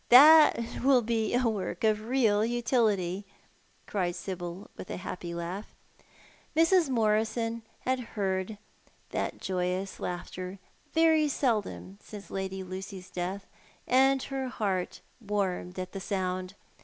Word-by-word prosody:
That 280 Hz, -3 st, +7 dB
will 260 Hz, -2 st, +5 dB
be 225 Hz, 0 st, 0 dB
a 245 Hz, -1 st, +3 dB
work 210 Hz, -2 st, -2 dB
of 215 Hz, -1 st, +2 dB
real 225 Hz, -5 st, +3 dB
utility,"' 220 Hz, -6 st, +1 dB, 0.6 s
cried 180 Hz, -4 st, -1 dB
Sibyl, 180 Hz, 0 st, -6 dB
with -, -, -9 dB
a -, -, -4 dB
happy 175 Hz, -1 st, -6 dB
laugh. 175 Hz, +5 st, -5 dB, 0.8 s
Mrs. 330 Hz, 0 st, +4 dB
jNIorison 225 Hz, 0 st, +1 dB, 0.2 s
had 260 Hz, 0 st, 0 dB
heard 200 Hz, -3 st, -2 dB, 0.5 s
that -, -, -2 dB
joyous 185 Hz, +1 st, -2 dB
laughter 180 Hz, +1 st, -5 dB, 0.3 s
very 320 Hz, -1 st, +4 dB
seldom 215 Hz, -7 st, -1 dB
since 200 Hz, -4 st, -10 dB
Lady 190 Hz, 0 st, -3 dB
Lucy's 185 Hz, 0 st, -7 dB
death, 185 Hz, +3 st, -3 dB, 0.4 s
and 265 Hz, +1 st, +4 dB
her 270 Hz, -1 st, -3 dB
heart 200 Hz, -7 st, -2 dB, 0.2 s
warmed 195 Hz, -4 st, -2 dB
at 185 Hz, 0 st, -4 dB
the 195 Hz, -, -5 dB
sound. 185 Hz, -1 st, -2 dB
205 Hz, 120 wpm, -29 LUFS, 185-240 Hz, 0.8 s, That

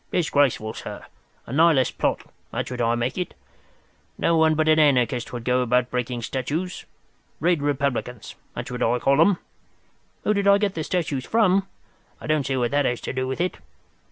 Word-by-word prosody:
Disgraceful, 140 Hz, -9 st, +1 dB
sir! -, -, -8 dB, 0.4 s
A 120 Hz, -, -8 dB
Nihilist 155 Hz, -3 st, +3 dB
plot—that's -, -, -3 dB
what 125 Hz, -1 st, -3 dB
I 115 Hz, 0 st, +2 dB
make 120 Hz, +6 st, -2 dB
it. 180 Hz, -, -4 dB, 0.8 s
No 170 Hz, -, +2 dB
one 160 Hz, -1 st, +4 dB
but 155 Hz, 0 st, +1 dB
an 155 Hz, 0 st, +5 dB
anarchist 125 Hz, -4 st, +2 dB
would 120 Hz, -2 st, -6 dB
go 125 Hz, +1 st, +2 dB
about 125 Hz, 0 st, +1 dB
breaking 125 Hz, -1 st, -2 dB
statues. 150 Hz, +10 st, -3 dB, 0.5 s
Red 170 Hz, 0 st, +2 dB
republicans—that's 135 Hz, -6 st, -3 dB
what 125 Hz, -, -5 dB
I 120 Hz, +2 st, +2 dB
call 140 Hz, +4 st, +3 dB
'em. 190 Hz, +2 st, +4 dB, 0.9 s
Who 210 Hz, -, +2 dB
did 200 Hz, -1 st, 0 dB
I 200 Hz, 0 st, +7 dB
get 200 Hz, -1 st, 0 dB
the 160 Hz, -, -3 dB
statues 150 Hz, -7 st, -2 dB
from? 195 Hz, -3 st, +3 dB, 0.5 s
I -, -, -10 dB
don't 155 Hz, -3 st, 0 dB
see 135 Hz, -, 0 dB
what 120 Hz, -2 st, 0 dB
that 145 Hz, 0 st, +2 dB
has 120 Hz, -2 st, 0 dB
to -, -, -4 dB
do 130 Hz, 0 st, -2 dB
with 130 Hz, +3 st, -4 dB
it. 180 Hz, +1 st, -1 dB
140 Hz, 180 wpm, -24 LUFS, 125-165 Hz, 0.9 s, I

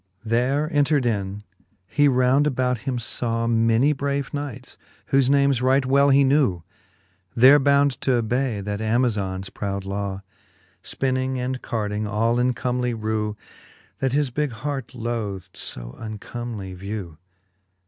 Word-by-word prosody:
XXII. 110 Hz, -, -8 dB
There 135 Hz, +6 st, +2 dB
entred 145 Hz, -2 st, +2 dB
in, 100 Hz, -3 st, -2 dB, 0.4 s
he 145 Hz, +9 st, +2 dB
round 130 Hz, +2 st, +3 dB
about 125 Hz, -3 st, 0 dB
him 125 Hz, -, -1 dB
faw 115 Hz, 0 st, -1 dB
Many 115 Hz, +4 st, +3 dB
brave 140 Hz, +1 st, -2 dB
knights, 135 Hz, -4 st, -6 dB, 0.4 s
whofe 135 Hz, -1 st, +4 dB
names 140 Hz, -2 st, +3 dB
right 130 Hz, +1 st, +3 dB
well 140 Hz, +2 st, +4 dB
he 140 Hz, 0 st, +5 dB
knew. 130 Hz, -, +2 dB, 0.7 s
There 130 Hz, +5 st, +7 dB
bound 140 Hz, -1 st, +2 dB
t'obay 120 Hz, -2 st, 0 dB
that 105 Hz, +1 st, -3 dB
Amazon's 105 Hz, -5 st, 0 dB
proud 100 Hz, -1 st, -4 dB
law. 100 Hz, 0 st, -4 dB, 0.6 s
Spinning 130 Hz, 0 st, -1 dB
and 125 Hz, +1 st, -3 dB
carding 105 Hz, -1 st, -2 dB
all 115 Hz, +3 st, +1 dB
in 125 Hz, +1 st, +2 dB
comely 125 Hz, 0 st, -1 dB
rew. 110 Hz, -1 st, -2 dB, 0.6 s
That 130 Hz, -1 st, 0 dB
his 145 Hz, -2 st, +1 dB
bigge 145 Hz, 0 st, -1 dB
hart 135 Hz, +1 st, -5 dB
loth'd 105 Hz, -6 st, -4 dB
fo -, -, -6 dB
uncomely 110 Hz, -2 st, -6 dB
vew. 95 Hz, -3 st, -6 dB
120 Hz, 135 wpm, -23 LUFS, 105-135 Hz, 0.7 s, There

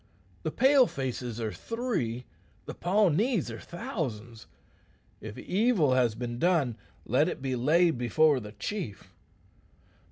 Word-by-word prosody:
The -, -, -2 dB
Pale 265 Hz, -, +5 dB
faces 125 Hz, -3 st, -4 dB
are 110 Hz, -2 st, -2 dB
three; 200 Hz, -, -3 dB, 0.4 s
the -, -, -6 dB
Pawnees 195 Hz, -, +1 dB
are 115 Hz, -, -7 dB
thousands. 130 Hz, -, -6 dB, 0.7 s
If 110 Hz, -1 st, -8 dB
evil 190 Hz, -, +2 dB
has 125 Hz, -4 st, +2 dB
been 120 Hz, 0 st, -5 dB
done, 160 Hz, -9 st, +2 dB, 0.3 s
let 135 Hz, +7 st, +3 dB
it -, -, -3 dB
be 130 Hz, -1 st, -2 dB
laid 155 Hz, +3 st, +3 dB
before 145 Hz, +4 st, +3 dB
the 105 Hz, -2 st, -9 dB
chief. 110 Hz, -, -6 dB
135 Hz, 125 wpm, -29 LUFS, 120-185 Hz, 0.7 s, Pale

